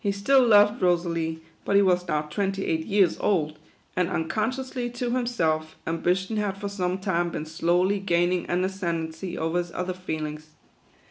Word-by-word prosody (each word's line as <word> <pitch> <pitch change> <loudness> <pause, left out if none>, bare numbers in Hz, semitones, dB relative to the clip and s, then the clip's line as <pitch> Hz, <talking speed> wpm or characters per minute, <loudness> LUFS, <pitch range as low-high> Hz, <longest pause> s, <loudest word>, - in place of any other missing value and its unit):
He 200 - +2
still 230 +8 +4
loved 210 -1 +5
Rosalie, 165 -2 0 0.2
but 200 - 0
he 200 - +6
was 180 -1 +2
now 150 -2 0
twenty 195 +5 -2
eight 160 0 -1
years 195 -3 +3
old, 155 -6 0 0.4
and, 180 -1 +1
uncon 190 +6 0
sciously 255 -2 -4
to 245 -1 -2
himself, 165 -11 0
ambition 180 +6 0
had 205 -2 -1
for 200 0 -4
some 185 -2 -1
time 175 -3 0
been 155 - -4
slowly 175 +5 +1
gaining 175 -1 +1
an 180 +1 0
ascendency 170 -2 -3
over 165 +2 0
his 175 -1 -4
other 180 0 -2
feelings. 155 -4 -5
180 Hz, 170 wpm, -26 LUFS, 165-200 Hz, 0.4 s, he